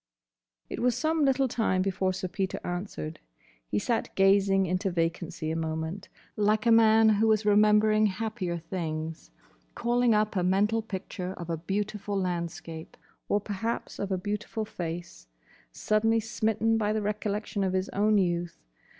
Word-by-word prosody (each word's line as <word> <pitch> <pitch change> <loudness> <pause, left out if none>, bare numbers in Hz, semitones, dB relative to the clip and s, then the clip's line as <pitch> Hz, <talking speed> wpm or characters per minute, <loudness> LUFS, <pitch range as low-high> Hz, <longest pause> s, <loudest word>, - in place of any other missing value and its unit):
It - - -5
was 245 -1 +2
some 315 0 +1
little 270 -1 +3
time 220 -6 +1
before 190 -1 0
Sir 185 0 -4
Peter 190 +1 -3
answered. 175 -3 -5 0.5
He - - -1
sat 225 - 0
gazing 195 0 +4
into 185 +2 0
vacancy 165 -1 -2
a - - -2
moment, 160 +3 -4 0.3
like 215 +1 +2
a 235 - +5
man 225 -1 +6
who 220 +1 +3
is 215 -1 +1
remembering 210 +1 +5
happier 205 -3 -3
things, 160 - -5 0.5
calling 240 -1 +2
up 215 0 +1
a 185 - +2
mental 200 +5 +2
picture 190 -3 -5
of 170 -2 -6
a - - 0
beautiful 200 +3 -2
landscape—or 170 +2 -4
perhaps 215 +3 -4
of 200 -1 -3
a 190 - +1
beautiful 210 +3 -3
face—suddenly 170 - -3
smitten 225 0 0
by 210 0 +1
the 215 - 0
recollection 210 0 -2
of 185 -1 0
his 185 0 0
own 210 +1 +2
youth. 175 -2 0
200 Hz, 145 wpm, -28 LUFS, 175-215 Hz, 0.5 s, man